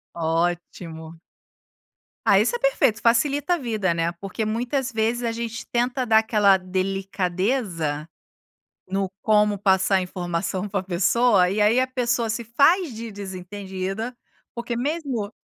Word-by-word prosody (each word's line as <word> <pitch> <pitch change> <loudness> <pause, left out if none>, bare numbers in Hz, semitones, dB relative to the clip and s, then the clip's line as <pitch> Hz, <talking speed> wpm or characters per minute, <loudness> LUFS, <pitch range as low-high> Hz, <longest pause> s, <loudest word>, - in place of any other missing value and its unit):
Ótimo. 165 -1 -3 1.1
Ah - - +6
isso - - +1
é - - -3
perfeito - - +2
facilita 280 +8 +2
a - - -4
vida, 215 - -1
né, 165 +1 -1
porque 195 +5 -5
muitas 245 +4 -2
vezes 225 +2 0
a 230 - 0
gente 230 0 -5
tenta 245 +2 0
dar 220 -2 +5
aquela 210 -3 +4
delicadeza, 185 - -2 0.8
no 195 0 -1
como 210 -1 +3
passar 190 0 +3
a - - +2
informação 180 +1 -3
pra 195 -2 -2
pessoa 190 +2 +3
e 205 +3 -1
aí 210 +4 +4
a 255 - +3
pessoa 245 -3 0
se 220 +2 -2
faz 280 - +3
de 225 0 -7
desentendida, 195 +3 -5 0.4
porque 235 0 -4
mesmo 270 -6 -2
210 Hz, 135 wpm, -23 LUFS, 185-240 Hz, 1.1 s, Ah